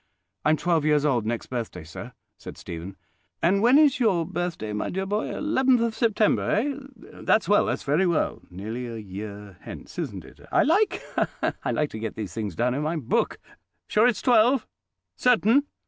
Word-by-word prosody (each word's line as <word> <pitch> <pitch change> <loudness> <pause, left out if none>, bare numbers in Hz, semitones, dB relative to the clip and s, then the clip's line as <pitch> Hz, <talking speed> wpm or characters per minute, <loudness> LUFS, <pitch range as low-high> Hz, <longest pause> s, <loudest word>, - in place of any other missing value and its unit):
"I'm 155 +1 +3
twelve 170 -2 +1
years 150 -1 +3
old 120 -7 +1
next 115 0 -2
birthday, 115 -8 -5
sir," 80 - -9 0.2
said - - -10
Stephen. 85 +3 -8 0.4
"And 190 +4 +2
when 245 +5 +6
is 290 -3 +5
your 190 -9 +2
birthday, 175 - -3
my 105 - -2
dear 190 +1 -2
boy? 205 +2 -1
Eleventh 265 -4 +2
of 230 -1 0
September, 220 -2 +1
eh? 280 +7 +1 0.5
That's 215 - +2
well—that's 205 - +2
very 155 +7 +2
well. 170 -3 0
Nearly 110 +7 -5
a 115 -1 -6
year 100 -1 -8
hence, - - -9
isn't - - -5
it? - - -16
I - - +4
like—ha, 400 +8 +1
ha!—I - - -2
like 150 -1 0
to 110 - -6
get 110 -1 -4
these 105 -4 -5
things 105 -6 -4
down 125 +7 +1
in 140 - -2
my 155 +3 -1
book. 145 -8 0 0.5
Sure 215 +3 +4
it's 245 - 0
twelve? 245 +1 +4 0.5
Certain?" 250 +3 +3
165 Hz, 180 wpm, -25 LUFS, -, 0.5 s, when